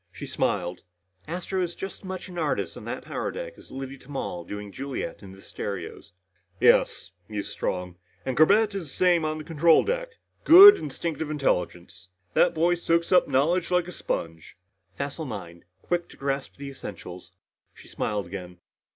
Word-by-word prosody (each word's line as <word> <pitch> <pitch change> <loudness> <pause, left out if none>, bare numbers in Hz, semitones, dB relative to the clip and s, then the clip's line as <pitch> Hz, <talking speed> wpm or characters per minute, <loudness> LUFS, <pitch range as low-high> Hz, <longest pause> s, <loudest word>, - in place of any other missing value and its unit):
She - - -8
smiled. 90 -2 -1 0.5
"Astro 180 +3 -3
is 175 -1 -2
as 195 - -6
much 185 -1 -6
an 180 -2 -7
artist 155 -3 -1
on - - -10
that - - -5
power - - -3
deck - - -6
as - - -16
Liddy 135 0 -7
Tamal 135 -11 -5
doing 105 +2 -7
Juliet 135 +5 -5
in 100 -2 -11
the 95 0 -14
stereos." 100 -4 -6 0.5
"Yes," - - +3 0.2
mused 105 -1 -4
Strong. 90 -1 -3 0.3
"And 130 - -2
Corbett 205 - +5
is 185 -7 -5
the - - -10
same 175 -3 +4
on 155 0 -1
the 155 - -7
control 165 +1 +4
deck. - - -2 0.3
Good 390 +5 +11
instinctive 155 +1 -4
intelligence. 90 - -2 0.3
That 175 - +4
boy 170 +2 +3
soaks 170 -1 0
up 180 - +5
knowledge 165 +6 +2
like 180 -1 +2
a - - -6
sponge." 80 - -5 0.4
"Facile 140 +3 -4
mind 85 - -8 0.2
quick 175 -1 -1
to - - -15
grasp 140 -1 -3
the 140 0 -7
essentials." 90 -8 -9 0.4
She - - -15
smiled 105 -2 -2
again. 90 -1 -8
145 Hz, 170 wpm, -26 LUFS, -, 0.5 s, Good